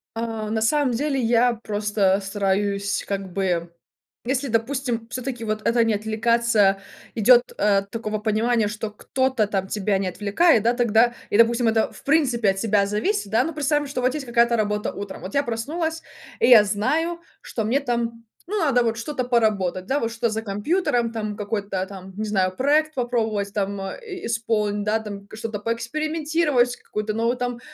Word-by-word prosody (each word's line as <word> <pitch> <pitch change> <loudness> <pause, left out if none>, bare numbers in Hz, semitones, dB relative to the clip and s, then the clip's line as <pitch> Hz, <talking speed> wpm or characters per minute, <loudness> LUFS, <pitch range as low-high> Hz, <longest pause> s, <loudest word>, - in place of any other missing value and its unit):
А, 225 -2 -3
на 220 0 -1
самом 280 +3 +2
деле, 275 +2 0
я 240 +1 +3
просто 205 -3 0
стараюсь 200 0 -1
как 195 -2 -3
бы, 175 -3 -1 0.5
если, 265 +2 -1
допустим, 235 0 -1
всё-таки, 250 -2 -5
вот 215 0 -2
это 235 0 +3
не 225 -1 +1
отвлекаться, 220 -2 +2 0.3
идёт, 240 +3 +6
э, 200 -1 +3
такого 215 -2 -3
понимания, 220 +1 +1
что 210 +1 -4
кто-то 260 +1 0
там 195 -2 -2
тебя 205 0 0
не 195 - -1
отвлекает, 210 - +3
да, 235 +2 +3
тогда 240 0 +3 0.2
и - - +1
допустим, 230 +1 +4
это 220 0 +1
в - - -14
принципе 260 -8 +2
от 195 - -6
тебя 205 -1 +2
зависит, 210 - -1
да. 225 +3 +3
Ну 325 - -4
представим, 295 0 0
что 270 -2 -3
вот 255 +1 +1
есть 290 -3 -4
какая-то 235 0 +3
работа 210 -1 -1
утром, 200 -1 -7
вот 185 - -7
я 280 - +3
проснулась, 320 +8 -3 0.4
и - - +3
я 225 -4 +9
знаю, 305 +12 0 0.2
что 220 - -4
мне 240 +6 +1
там, 235 -3 -3 0.3
ну, 425 - 0
надо 270 -7 +3
вот 225 -1 -1
что-то 255 +1 -3
поработать, 210 -7 +1
да, 275 +7 0
вот 230 -3 -2
что-то 230 +1 -1
за 220 +1 -2
компьютером, 235 - 0
там 215 -2 -4
какой-то 200 -2 -2
там, 190 -1 -10
не 215 - -2
знаю, 190 -3 +1
проект 305 +5 +2
попробовать, 220 -5 -1
там 200 -1 -2 0.2
и-исполнить, 225 - -2
да, 215 +2 +1
там 200 -2 -8
что-то 220 -1 -5
поэкспериментировать, 295 +3 0
какую-то 215 0 -4
новую 230 +3 0
там 245 -1 -3
225 Hz, 175 wpm, -23 LUFS, 205-250 Hz, 0.5 s, я